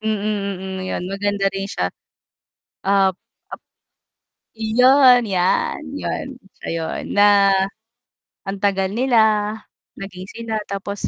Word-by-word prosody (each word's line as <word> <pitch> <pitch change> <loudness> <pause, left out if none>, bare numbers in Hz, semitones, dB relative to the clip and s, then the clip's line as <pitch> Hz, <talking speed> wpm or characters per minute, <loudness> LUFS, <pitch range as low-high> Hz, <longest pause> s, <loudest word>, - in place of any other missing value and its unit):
Mm, 220 - -3
mm, 200 -3 -3
ayun, 180 - -3
maganda 200 0 -1
rin 195 0 -3
siya. 90 - -2 0.9
Ap 195 -1 +3 0.3
ap - - -9 1.0
iyon, 250 +2 +5
'yan, 185 +8 0 0.2
'yun - - -4 0.3
siya - - -6
'yun. 165 -1 -3
Na, 205 -1 +5 1.0
ang 195 - -3
tagal 195 -1 +1
nila, 220 -3 +2 0.5
naging 185 -1 -8
sila, 225 -2 -4
tapos 200 +1 -4
200 Hz, 110 wpm, -20 LUFS, 195-220 Hz, 1.0 s, iyon